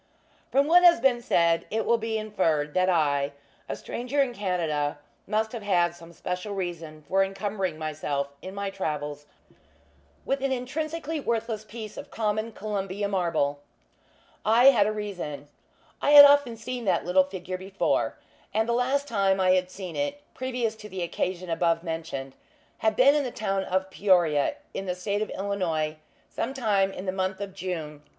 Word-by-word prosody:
From 275 +1 +4
what 350 +4 +6
has 345 -5 +7
been 245 -1 +3
said, 170 -7 +2
it 220 +1 -1
will 235 0 +3
be 225 0 -2
inferred 165 -9 0
that 185 0 +2
I 145 -4 +1 0.4
a - - -2
stranger 250 +4 -4
in 270 -3 +2
Canada 165 -9 -1 0.3
must 220 +1 0
have 235 - -5
had 175 -4 +2
some 170 -1 -13
special 180 +4 -4
reason 165 -5 -5
for 195 +1 +3
incumbering 195 -3 -3
myself 150 -3 -2
in 190 +1 -8
my 200 -1 -3
travels 150 -5 -4 1.0
with 275 0 0
an 275 0 0
intrinsically 305 +5 -3
worthless 230 -4 -2
piece 215 0 -9
of - - -8
common 215 0 -1
Columbia 200 -1 -3
marble. 165 -7 0 0.8
I 240 +5 +7
had 210 -6 +3
a - - +1
reason. 185 -9 -5 0.5
I - - +1
had 285 - +14
often 285 -5 +4
seen 245 +1 -5
that 190 - +1
little 185 +2 +4
figure 185 -1 -6
before; 190 +1 -1 0.4
and 220 +1 +2
the 235 - +1
last 265 +4 +1
time 195 -5 +2
I 185 -1 +4
had 185 0 +2
seen 185 -2 -7
it, 290 0 -2
previous 245 -3 -2
to 210 -1 -10
the 185 -2 -4
occasion 180 +1 -3
above 165 0 +1
mentioned, 160 -5 -5 0.5
had 220 -1 +1
been 270 +3 +6
at 295 -1 +2
the 255 - -2
town 195 -4 -2
of 190 +1 -1
Peoria, 175 - +3 0.2
in 195 - -4
the 180 - -1
State 200 +3 -2
of 215 - -2
Illinois, 170 -6 -2 0.3
sometime 215 -7 0
in 190 - -7
the 185 - 0
month 190 0 -2
of 200 -1 -5
June, 165 -6 -5
1855. - - -32
195 Hz, 170 wpm, -27 LUFS, 175-230 Hz, 1.0 s, had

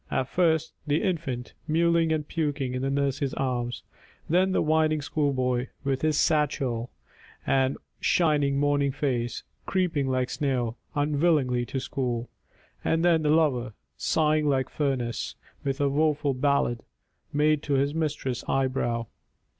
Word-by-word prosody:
At 130 0 -1
first 160 -3 +2
the 150 +5 +1
infant, 160 - -2
Mewling 165 0 +3
and 155 -2 -1
puking 145 -5 -1
in 125 - -2
the 135 - 0
nurse's 140 0 0
arms. 125 -2 -2 0.4
And - - -3
then 185 +2 +4
the - - +2
whining 155 0 +2
schoolboy, 130 -4 0 0.2
with 135 -2 -1
his 155 -1 +2
satchel, 130 -6 +1 0.6
And 135 0 +2 0.2
shining 145 -5 +2
morning 145 -1 +2
face, 125 -4 -2 0.2
creeping 170 -7 +1
like 130 -1 0
snail 125 -6 -1 0.2
Unwillingly 145 -4 +2
to 135 - -2
school. 125 -3 -3 0.5
And 165 +1 +1
then 165 -2 +4
the 150 - +1
lover, 135 -7 +2 0.2
Sighing 155 -1 +2
like 130 -2 +1
furnace, 130 -6 -2 0.3
with 135 0 -2
a 145 - +3
woeful 145 0 +1
ballad 130 -3 +1 0.5
Made 150 0 +2
to 145 - -2
his 140 +1 +2
mistress' 150 -6 -2
eyebrow. 130 -3 0
140 Hz, 140 wpm, -27 LUFS, 130-155 Hz, 0.6 s, then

